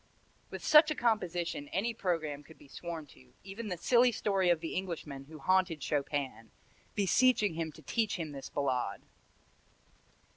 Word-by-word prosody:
With - - -7
such 305 0 +8
a 305 - -1
composition 180 - -1
any 225 +9 -1
programme 165 -8 -2
could 160 +2 -16
be - - -17
sworn 165 +1 -6
to, 65 -1 -21
even 200 +4 -7
the 180 -3 -3
silly 245 +7 +4
story 195 -5 +1
of 170 -2 +3
the 165 - -5
Englishman 160 -7 -4
who 155 +2 -11
haunted 175 -1 +1
Chopin, 140 -5 -2 0.5
beseeching 210 +1 +3
him 160 -1 -3
to 155 - -15
teach 215 - 0
him 160 -4 -4
this 135 -1 -7
Ballade. 130 -3 -1
170 Hz, 155 wpm, -32 LUFS, 145-200 Hz, 0.5 s, such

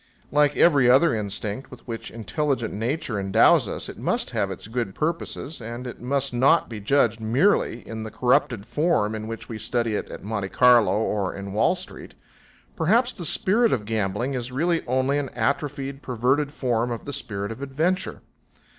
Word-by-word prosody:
Like 145 0 +3
every 140 -7 +5
other 135 +5 +5
instinct 105 +3 -3
with 125 0 -14
which 115 -1 -5
intelligent 115 +4 -2
nature 115 0 -2
endows 95 0 +4
us, - - -4
it - - -9
must - - -1
have - - 0
its - - -7
good 110 -3 -3
purpose, 160 -2 -3
and 120 +3 -6
it 125 - -8
must 135 +1 -1
not 135 +7 +4
be 110 -3 -6
judged 115 0 +2
merely 120 - +1
in 110 -1 -6
the 110 - -5
corrupted 120 -2 +1
form 150 -9 +1
in 110 0 -5
which 115 0 -6
we 110 -2 -6
study 115 -2 -1
it - - -3
at - - -9
Monte 100 -2 -3
Carlo 120 -6 +5
or 105 -4 -1
in 100 0 -6
Wall 110 - +3
Street. 185 +1 -10 0.6
Perhaps 230 +10 +2
the 175 - -6
spirit 215 +8 +2
of 105 -5 0
gambling 110 +4 -1
is 125 -1 -4
really 165 +5 0
only 130 +3 +1
an 140 -2 -3
atrophied, 140 +3 -2
perverted 130 +4 0
form 120 -4 -1
of 120 -1 -5
the 140 - -5
spirit 100 -3 -4
of 115 - -8
adventure. 155 +7 -1
125 Hz, 180 wpm, -24 LUFS, 110-145 Hz, 0.6 s, every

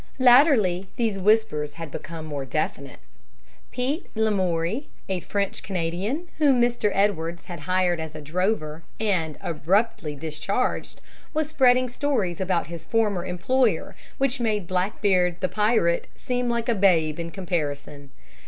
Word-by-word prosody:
Latterly 245 - +5
these 220 -5 0
whispers 195 -8 +2
had 165 -2 -8
become 160 +1 -7
more 145 -3 -4
definite. 140 -1 -3 0.7
Pete 270 +8 -2
Lamoury, 200 - 0 0.2
a 190 -2 -1
French 200 +3 -2
Canadian, 190 - -2
whom 280 -5 +4
Mr. 240 -3 +2
Edwards 175 -4 0
had 175 -3 -8
hired 180 -2 +2
as 160 -1 -6
a 155 - -6
drover, 165 0 -1 0.2
and 180 -8 0
abruptly 175 0 0
discharged, 160 - -2 0.3
was 310 -1 0
spreading 255 -4 +4
stories 235 - -1
about 185 -2 +1
his 165 +1 -9
former 210 -6 +1
employer 190 +3 0 0.2
which 270 -1 0
made 215 -5 0
Blackbeard, 185 -1 +1
the 185 - +1
pirate, 210 -5 +1
seem 250 -1 -2
like 235 -1 -1
a 240 - +3
babe 170 -7 +3
by 170 0 -4
comparison. 145 -6 -4
190 Hz, 135 wpm, -25 LUFS, 165-230 Hz, 0.7 s, Latterly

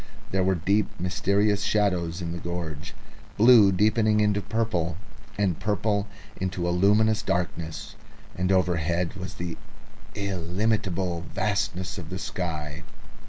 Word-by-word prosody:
There 95 0 +2
were 95 0 +2
deep 100 +5 +1
mysterious 100 +3 +1
shadows 90 -5 0
in 85 - -3
the 85 - -4
gorge, 85 +1 -5 0.4
blue 110 -2 +7
deepening 105 +2 +3
into 105 -1 +2
purple, 95 -8 -1 0.4
and 100 -5 +1
purple 105 0 0 0.3
into 90 -2 -2
a - - +1
luminous 105 +4 +3
darkness, 85 -4 -3 0.4
and 90 +1 0
overhead 85 -2 +1
was 95 -1 -7
the 85 -1 -5 0.6
illimitable 95 -1 -1
vastness 100 -3 -1
of 80 -3 -8
the 95 - -4
sky. 80 -5 -4
95 Hz, 120 wpm, -26 LUFS, 85-105 Hz, 0.6 s, blue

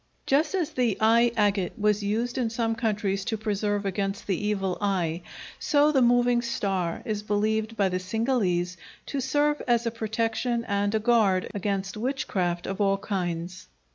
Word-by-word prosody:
Just 300 +6 +2
as 345 -6 -1
the 240 -5 0
eye 230 +2 +4
agate 200 -3 +1
was 210 0 +2
used 230 +5 -1
in 235 -3 0
some 225 0 -1
countries 210 -4 -1
to 225 -1 -1
preserve 205 -1 -1
against 195 +1 -2
the 205 +1 -1
Evil 195 -3 -1
Eye, 180 -5 0 0.4
so 295 +1 +3
the 270 -3 +3
moving 245 0 +4
star 195 -7 -2
is 210 -2 -2
believed 215 +2 -1
by 200 -2 +3
the 185 0 -1
Cingalese 185 -4 0 0.3
to 280 - -3
serve 295 +3 +1
as 240 -1 +2
a 230 - 0
protection 230 +1 -1
and 205 +1 0
a - - +2
guard 215 -5 +2
against 195 -1 -2
witchcraft 195 -8 -1
of 195 +2 -3
all 195 -1 +3
kinds. 180 -3 -4
210 Hz, 165 wpm, -26 LUFS, 195-235 Hz, 0.4 s, eye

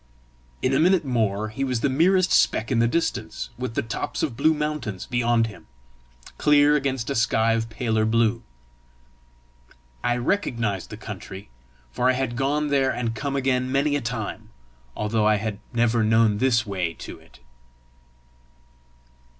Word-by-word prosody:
In 130 - +2
a 135 - +3
minute 175 0 +3
more 110 -4 0
he 110 +6 -4
was 125 -4 -1
the - - +2
merest 180 +7 +3
speck 110 - +2
in 120 - +2
the 115 - +4
distance, 115 -8 -2
with 120 -1 -5
the - - 0
tops 115 - -4
of 125 - -1
blue 160 +6 +3
mountains 150 -10 -3
beyond 120 -2 +1
him, 110 -3 -10 0.7
clear 150 0 +5
against 135 -3 -1
a - - -1
sky 115 0 +2
of 115 0 -1
paler 110 -1 0
blue. 110 0 +2 1.6
I 120 0 +1
recognised 115 - -1
the - - -8
country, 95 -7 -9 0.4
for 125 - +1
I - - +4
had 130 -2 -2
gone 145 +4 0
there 135 -2 +2
and 115 -2 -2
come 140 +4 -3
again 130 -1 0
many 140 +2 +1
a 145 - -1
time, 115 -2 -5 0.5
although 105 0 +1
I 110 - +4
had 105 0 -3
never 120 -1 +2
known 110 -1 +3
this 120 -1 +2
way 95 -5 -2
to - - -9
it. - - -20
120 Hz, 160 wpm, -24 LUFS, 110-135 Hz, 1.6 s, clear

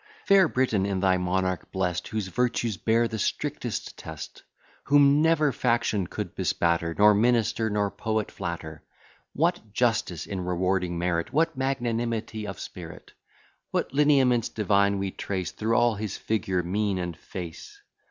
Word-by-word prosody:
Fair 195 -3 +6
Britain, 125 -8 +1
in 100 -1 -1
thy 95 -1 +3
monarch 95 0 -1
blest, 90 -2 -1
Whose 110 -3 -3
virtues 120 0 0
bear 115 +5 +2
the 110 -1 -5
strictest - - -3
test; - - -8 0.4
Whom 145 +1 +5
never 155 -2 +3
faction 115 -6 0
could - - -5
bespatter, 85 -1 0
Nor 105 +1 +7
minister 115 0 +2
nor 105 -1 0
poet 110 -1 -2
flatter; 80 -2 -6 0.5
What 165 - 0
justice 110 - 0
in 95 -2 -4
rewarding 90 0 0
merit! 85 +1 -1
What 155 +3 +1
magnanimity 115 -4 -2
of 95 -4 -6
spirit! - - -9 0.6
What - - -2
lineaments 135 -5 +3
divine 100 -1 +2
we 95 -1 -2
trace 95 -3 -4
Through 110 +1 -1
all 120 0 +4
his 105 -1 -4
figure, 95 -4 -1
mien, 100 +2 0
and 90 -2 -3
face! 90 - -9
105 Hz, 145 wpm, -26 LUFS, 95-120 Hz, 0.6 s, Nor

